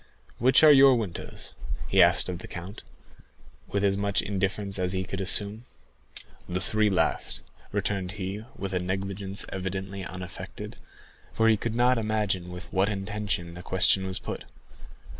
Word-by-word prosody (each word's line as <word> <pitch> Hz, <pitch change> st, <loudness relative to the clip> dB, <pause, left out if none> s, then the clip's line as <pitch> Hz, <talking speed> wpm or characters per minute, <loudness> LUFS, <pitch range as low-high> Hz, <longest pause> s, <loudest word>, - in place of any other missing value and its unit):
"Which 130 Hz, +5 st, +6 dB
are 155 Hz, -, +10 dB
your 135 Hz, -2 st, +8 dB
windows?" 105 Hz, -8 st, -5 dB, 0.4 s
asked -, -, +6 dB
he 90 Hz, -, -3 dB
of 85 Hz, -, -6 dB
the -, -, -9 dB
count, 90 Hz, +5 st, -8 dB, 0.9 s
with 100 Hz, 0 st, -1 dB
as 100 Hz, -1 st, +3 dB
much 100 Hz, 0 st, +1 dB
indifference 100 Hz, 0 st, -1 dB
as 90 Hz, 0 st, 0 dB
he 95 Hz, 0 st, 0 dB
could 95 Hz, +1 st, -4 dB
assume. 105 Hz, +4 st, +1 dB, 0.8 s
"The 90 Hz, +1 st, -1 dB
three 110 Hz, +2 st, +2 dB
last," 95 Hz, -, 0 dB, 0.3 s
returned 95 Hz, -2 st, -1 dB
he, 100 Hz, +1 st, -4 dB
with 95 Hz, -1 st, -5 dB
a 90 Hz, -, +1 dB
negligence 95 Hz, +2 st, -2 dB
evidently 95 Hz, +1 st, -4 dB
unaffected, 90 Hz, 0 st, -7 dB, 0.6 s
for 115 Hz, 0 st, +4 dB
he 110 Hz, -, +6 dB
could 115 Hz, +2 st, -3 dB
not 125 Hz, 0 st, +4 dB
imagine 105 Hz, -5 st, -1 dB
with 90 Hz, +2 st, -7 dB
what 95 Hz, +2 st, +3 dB
intention 100 Hz, -4 st, -3 dB
the 90 Hz, -, -8 dB
question 95 Hz, +1 st, +3 dB
was 95 Hz, -, +1 dB
put. -, -, -6 dB
100 Hz, 155 wpm, -27 LUFS, 95-105 Hz, 0.9 s, are